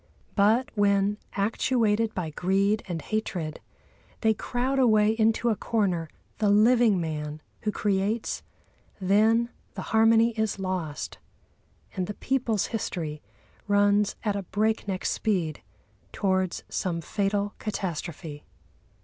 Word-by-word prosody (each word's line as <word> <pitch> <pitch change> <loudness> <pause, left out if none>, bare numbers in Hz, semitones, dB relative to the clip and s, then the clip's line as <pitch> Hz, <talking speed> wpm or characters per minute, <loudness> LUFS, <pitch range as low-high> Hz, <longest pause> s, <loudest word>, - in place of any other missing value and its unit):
But 220 +5 +3
when, 205 0 +2
actuated 220 +1 +1
by 170 -4 -3
greed 195 +6 +1
and 170 -4 -4
hatred, 180 -8 -3 0.6
they 220 -1 +4
crowd 255 +5 -1
away 215 -4 +5
into 225 +1 +2
a 220 - +2
corner 185 -7 0 0.3
the 210 -2 +3
living 220 0 +5
man 150 -2 -4 0.2
who 210 - 0
creates, 205 +2 -1 0.6
then 220 +5 +3 0.2
the - - -4
harmony 225 +1 +5
is 220 -2 -1
lost, 155 - -4 0.8
and 185 -2 -1
the 210 - -5
people's 240 -6 0
history 160 -8 -3 0.5
runs 205 0 +3
at 210 -3 0
a 200 - -1
break 215 +4 0
neck 185 -2 -3
speed 175 -8 0 0.5
towards 190 -2 0
some 175 -3 -2
fatal 200 +4 -1
catastrophe. 170 -7 -4
205 Hz, 115 wpm, -27 LUFS, 185-220 Hz, 0.8 s, away